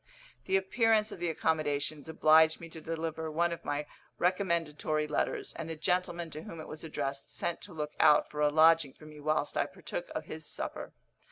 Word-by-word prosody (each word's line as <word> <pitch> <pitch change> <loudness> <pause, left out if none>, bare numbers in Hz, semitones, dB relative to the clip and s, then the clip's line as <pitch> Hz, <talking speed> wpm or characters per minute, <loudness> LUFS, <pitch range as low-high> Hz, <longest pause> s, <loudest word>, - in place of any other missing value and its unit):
The 190 - +3
appearance 215 +2 +2
of - - -8
the 175 0 0
accommodations 155 -1 -1
obliged 160 0 +5
me 165 - -9
to 160 0 -9
deliver 160 0 -3
one 170 +2 +1
of 170 - -5
my 145 +1 -2 0.3
recommendatory 170 -4 0
letters, 150 - -1
and 165 0 -6
the 160 - -3
gentleman 175 0 -1
to 155 - -6
whom 165 0 -9
it 155 - -7
was 155 - -8
addressed 140 -3 -4
sent 170 - -3
to 200 - -7
look 150 -1 -4
out 150 - +6
for 150 - -3
a 150 - +5
lodging 155 -2 +5
for 155 - -16
me 150 -1 -11
whilst 155 +1 0
I - - +2
partook - - -6
of - - -3
his - - -7
supper. - - -5
160 Hz, 195 wpm, -31 LUFS, 150-170 Hz, 0.3 s, out